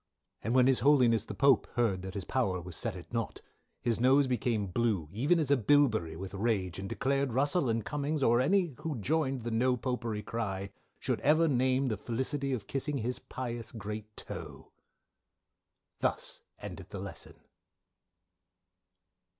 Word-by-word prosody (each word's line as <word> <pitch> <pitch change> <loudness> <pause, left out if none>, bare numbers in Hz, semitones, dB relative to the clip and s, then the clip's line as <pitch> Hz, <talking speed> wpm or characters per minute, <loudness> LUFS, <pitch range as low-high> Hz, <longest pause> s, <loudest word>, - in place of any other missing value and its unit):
"And 115 +4 0
when 130 -1 +6
his 130 -1 +4
holyness 125 -6 +4
the - - -6
Pope 140 -4 +4
heard 110 -6 +1
that 95 +1 -7
his 100 -3 -3
power 100 -8 0
was 90 -1 -7
set 115 -5 -3
at 85 +1 -11
naught, 115 -2 -2 0.4
his 115 -2 +1
nose 135 +3 +5
became 120 -4 0
blue 100 -4 0
even 140 - +2
as 150 -4 0
a - - +7
bilberry 110 - +3
with 95 +3 -7
rage 100 -4 -1
and 95 0 -5
declared 135 -1 0
Russell 145 +2 +2
and 115 -1 0
Cummings 150 0 -1
or 120 0 +4
any 180 +1 +2
who 155 -5 -3
joined 135 +2 0
in - - -12
the 120 - -3
No 125 +3 +2
Popery 120 -4 -3
cry, 100 -3 -3 0.3
should - - -1
ever 155 +4 +4
name 130 -1 +2
the 110 - -1
felisity 130 +6 -2
of 120 -6 -2
kissing 140 +1 -2
his 125 +1 -2
pious 120 -3 -5
great 105 -1 -7
toe. - - -8 1.3
"_Thus - - -1 0.2
Endeth - - -8
the - - -6
Lesson. - - -8
120 Hz, 165 wpm, -31 LUFS, 105-135 Hz, 1.3 s, a